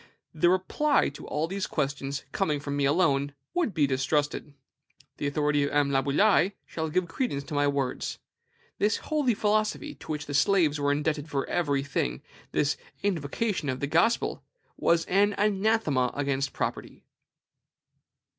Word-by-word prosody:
The 160 +2 +3
reply 190 +11 +2
to 140 - -11
all 150 +2 -1
these 195 +2 -3
questions, 140 -1 -2
coming 155 -7 0
from 145 0 -4
me 140 -1 +1
alone, 140 -2 +2 0.2
would 345 -10 +1
be 155 -6 +2
distrusted. 145 +2 -1 0.6
The 145 - -2
authority 145 0 +1
of 140 - 0
M. 145 -1 +2
Laboulaye 150 +9 +3
shall 160 -1 -4
give 180 +3 0
credence 165 - -2
to 150 - -9
my 145 0 +2
words. 140 -2 -2 0.6
This 210 +1 +2
holy 290 -7 0
philosophy, 215 +8 0
to - - -9
which 150 -1 -3
the 145 - -6
slaves 150 0 +3
were 145 0 +2
indebted 150 +1 -1
for 140 -2 -1
every 145 -5 0
thing, 65 - -2 0.3
this 145 0 +1 0.3
invocation 175 -1 -1
of 130 0 -2
the - - -1
Gospel, 170 +11 +1 0.3
was 170 -1 +2
an 200 +2 +3
anathema 200 - +2
against 140 -1 -1
property. - - -4
150 Hz, 150 wpm, -27 LUFS, 140-195 Hz, 0.6 s, The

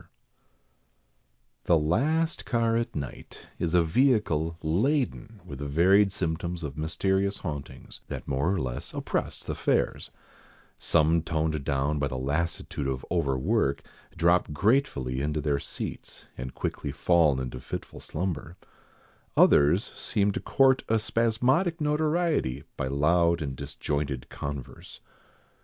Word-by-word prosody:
] - - -45
THE 85 - +5
last 150 - +1
car 115 -1 +1
at 115 0 -1
night, 70 -3 -7
is 85 0 0
a 85 - +5
vehicle 85 - +2
laden 110 - 0
with 70 0 -8
varied 95 +8 +4
symptoms 85 -1 -3
of 70 -3 -5
mysterious 95 +6 0
hauntings 75 -6 -7
that - - -6
more 70 +6 +1
or 95 - 0
less 60 -2 -4
oppress - - -2
the - - -3
fares, - - 0 0.7
some 80 +1 +3
toned 80 -2 -1
down 70 +2 0
by 70 - +1
the 65 -2 -4
lassitude 70 +1 -2
of 65 -1 -3
overwork, 70 0 +1 0.3
drop 85 0 +3
gratefully 75 - +1
into 75 +1 -1
their 75 -2 0
seats, - - -7
and 65 +1 -7
quickly 70 - -3
fall 75 -1 +3
into 65 -1 -5
fitful 65 - -7
slumber, 85 0 -4 0.8
others 75 +8 +5
seem 100 -1 0
to - - -3
court 135 -1 +3
a 115 - +4
spasmodic 125 - +1
notoriety 150 - 0
by 65 - -2
loud 85 +5 +3
and 70 -4 -4
disjointed 70 -1 -3
converse. 70 -2 -7
80 Hz, 125 wpm, -27 LUFS, 70-105 Hz, 0.8 s, THE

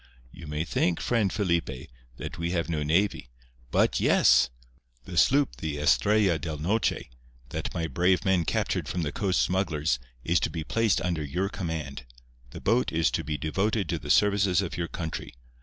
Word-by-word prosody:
You 85 +3 -11
may 75 +1 -2
think, 85 0 0
friend 110 -6 +1
Felipe, 85 - -1 0.3
that 80 - -7
we 85 0 -1
have 85 -2 -1
no 80 -2 -1
navy—but 60 -8 -1
yes! 65 -1 +5 0.6
The 90 - -8
sloop 140 - +3
the 75 -2 -4
Estrella 85 - +3
del 80 -3 -4
Noche, 90 - -1 0.4
that - - -4
my 85 - -1
brave 90 +4 +1
men 95 -3 +3
captured - - -1
from 90 - -2
the 75 - -2
coast 95 -3 +1
smugglers, 80 -9 0 0.2
is 85 +2 +2
to - - -1
be 80 -2 -4
placed 115 +4 +1
under 85 -4 -1
your 90 +7 -2
command. 75 -9 -5 0.4
The - - -9
boat 120 +2 +2
is 80 0 +2
to 85 - -1
be 75 0 -3
devoted 95 +6 -1
to - - -1
the - - -9
services 100 -3 +3
of 100 - -2
your 85 -1 -2
country. 80 -7 -6
85 Hz, 175 wpm, -27 LUFS, 75-95 Hz, 0.6 s, yes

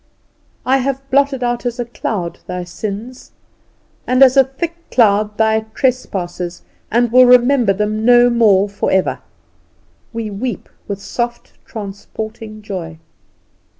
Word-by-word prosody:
"I 265 +1 +3
have 270 +1 -3
blotted 275 -1 +2
out 240 0 -1
as 245 0 -3
a 240 - -1
cloud 200 -6 -4
thy 180 0 -4
sins, 215 +7 -7 0.7
and 255 +2 +5
as 260 0 +6
a 270 - +7
thick 295 +6 -5
cloud 210 -2 +2
thy 220 0 +3 0.2
trespasses, 180 -9 -2 0.3
and 235 0 +1
will 255 +1 +7
remember 245 -2 +5
them 210 +2 -1
no 245 +1 +6
more 210 -4 +4
for 200 0 -3
ever." 190 -1 +1 0.9
We 230 -2 -4
weep 235 +5 -5 0.2
with 200 -1 -4
soft 240 +4 -4
transporting 215 +1 -8
joy. 175 -6 -6
225 Hz, 130 wpm, -17 LUFS, 200-250 Hz, 0.9 s, a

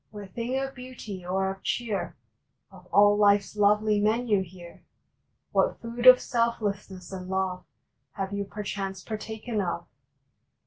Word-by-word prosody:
What 205 -3 -10
thing 240 +3 -2
of 270 0 -2
beauty 250 -7 -8
or 190 +2 0
of 195 0 -9
cheer 225 -5 -2 0.5
Of - - -15
all 205 0 +5
life 205 -1 +5
s - - -13
lovely 210 +1 +3
menu 215 -1 +2
here? 175 -1 -11 0.7
What - - +2
food 235 +2 -1
of 255 0 +11
Selflessness 205 -6 -2
and 185 -1 -6
Love 190 -1 -1 0.5
Have 195 0 -4
you 200 0 -1
perchance 195 -1 -5
partaken 220 0 -4
of? 170 -2 -3
205 Hz, 140 wpm, -27 LUFS, 190-230 Hz, 0.7 s, of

